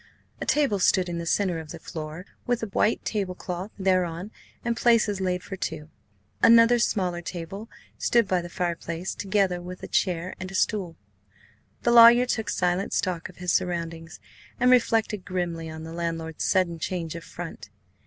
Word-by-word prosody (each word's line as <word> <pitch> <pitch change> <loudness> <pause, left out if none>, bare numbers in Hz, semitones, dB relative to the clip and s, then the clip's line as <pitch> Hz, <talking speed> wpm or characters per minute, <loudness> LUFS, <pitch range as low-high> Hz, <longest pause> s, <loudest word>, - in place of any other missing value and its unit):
A - - -4
table 275 -9 +2
stood 185 0 +3
in 170 -1 -3
the 170 - -5
centre 180 -2 +1
of 160 -1 -9
the 170 - -7
floor, 160 +2 -7 0.2
with 245 -1 0
a 225 - -3
white 210 +3 +1
table 195 -4 -2
cloth 180 +2 -5
thereon 185 -1 0 0.3
and 235 -1 0
places 220 -5 +3
laid 180 -1 -1
for 195 - -6
two. 160 -4 -5 0.5
Another 230 +1 +7
smaller 180 -6 0
table 185 +6 -7 0.3
stood 235 -3 +3
by 185 -1 +1
the 175 - -8
fireplace, 170 0 -3
together 190 -3 0
with 180 +1 -9
a - - -5
chair 180 -1 0
and 185 0 -5
a 195 - -8
stool. 185 -4 0 0.9
The 240 - +3
lawyer 235 +1 +9
took 225 -3 -2
silent 180 +2 0
stock 180 -3 -1
of 180 - -16
his 180 -1 -1
surroundings, 165 -2 -2 0.4
and 250 +1 +4
reflected 225 -5 +2
grimly 170 -3 -3
on 160 0 -8
the 160 0 -8
landlord's 165 -1 -3
sudden 175 -3 +1
change 165 -2 -3
of 170 -1 -7
front. 160 - -8
180 Hz, 175 wpm, -26 LUFS, 170-205 Hz, 0.9 s, lawyer